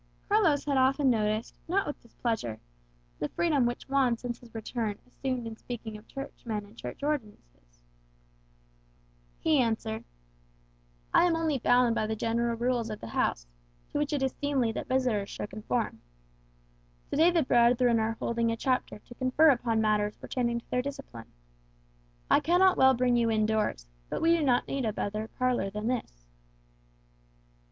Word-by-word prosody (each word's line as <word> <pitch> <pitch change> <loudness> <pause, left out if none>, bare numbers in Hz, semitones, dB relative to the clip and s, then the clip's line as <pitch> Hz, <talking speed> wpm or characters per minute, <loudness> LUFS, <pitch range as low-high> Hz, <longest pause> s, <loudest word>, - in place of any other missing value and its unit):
Carlos 370 -9 +3
had 280 -2 +1
often 265 +1 +3
noticed, 215 0 0
not 390 +4 +1
with 290 - -6
displeasure, 225 - -3 0.6
the 150 - -2
freedom 295 -8 +2
which 240 - -4
Juan 265 -3 +2
since 240 0 -5
his 235 -2 -17
return 220 -1 -3
assumed 250 -1 -4
in 225 -1 -6
speaking 225 -1 -7
of 210 +1 -12
Churchmen 230 -6 -6
and 205 +2 -18
Church 260 - -8
ordinances. - - -5 1.6
He 310 -3 +2
answered, 220 - -1 1.1
"I - - +6
am 345 -2 +2
only 320 -4 0
bound 245 0 +4
by 215 -1 0
the 220 - -2
general 230 +2 0
rules 240 -1 0
of 215 - -5
the 115 - -8
house, - - 0 0.5
to - - -1
which 295 -1 -1
it 285 -3 0
is 265 - 0
seemly 275 -5 0
that - - -5
visitors 250 -6 0
should 205 - -6
conform. 215 - -2 1.1
To - - -1
day 325 +3 +6
the 340 -3 +2
brethren 240 -1 +4
are 220 0 -1
holding 230 0 0
a 230 - -2
Chapter 255 -1 -1
to 225 - -14
confer 260 +6 +4
upon 235 -3 +1
matters 210 -1 +1
pertaining 235 -2 -2
to - - -33
their 250 - +2
discipline. 250 - -8 1.0
I - - +5
cannot 365 +3 +4
well 265 0 +5
bring 245 0 +2
you 230 -1 +2
in 215 -1 +2
doors; 215 - 0 0.2
but - - -2
we 335 +1 +5
do 335 - 0
not 250 -3 +2
need 275 -1 -2
a 220 -2 0
better 215 +1 -3
parlour 250 -5 0
than 210 +2 -5
this." 140 - -3
240 Hz, 165 wpm, -29 LUFS, 220-270 Hz, 1.6 s, I